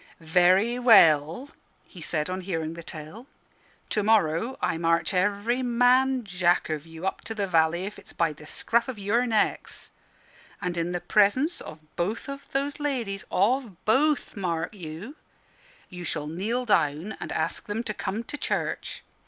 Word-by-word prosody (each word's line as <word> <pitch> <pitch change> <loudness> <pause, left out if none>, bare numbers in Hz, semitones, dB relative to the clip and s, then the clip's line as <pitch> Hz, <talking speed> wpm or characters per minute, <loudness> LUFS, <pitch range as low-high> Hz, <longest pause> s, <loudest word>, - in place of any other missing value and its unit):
"Very 190 +7 +4
well," 175 - +5 0.3
he 180 - -13
said, 150 0 -2
on 185 +1 -3
hearing 165 -4 -3
the 170 - -8
tale; 165 - -9 0.6
"to 210 - +1
morrow 210 +2 +2
I 165 - -1
march 165 +3 +1
every 205 +6 +1
man 250 +1 +3
Jack 180 -4 +1
of 155 +1 -4
you 165 +2 -8
up 190 - -2
to 225 - -5
the 205 -2 0
valley, 170 0 +2
if 205 - -7
it's - - -14
by 165 -2 0
the 150 +1 -14
scruff 235 +8 0
of 260 -4 -5
your 220 +5 +1
necks, 220 -2 -1 0.7
and 180 -1 -3
in 170 +1 -1
the 175 -1 -2
presence 255 - +2
of 155 0 -10
both 205 +10 -2
of 275 0 -8
those 280 +2 -1
ladies 240 -9 -2
of 215 -1 0
both, 285 +7 +2
mark 175 -3 -2
you 185 - -8 0.7
you 180 -1 -9
shall 150 -3 -2
kneel 210 +11 -2
down 160 -1 +1
and - - -6
ask - - -2
them 215 +3 -2
to 215 - -3
come 205 +3 -3
to 295 - -6
church. - - -3
200 Hz, 165 wpm, -26 LUFS, 170-235 Hz, 0.7 s, well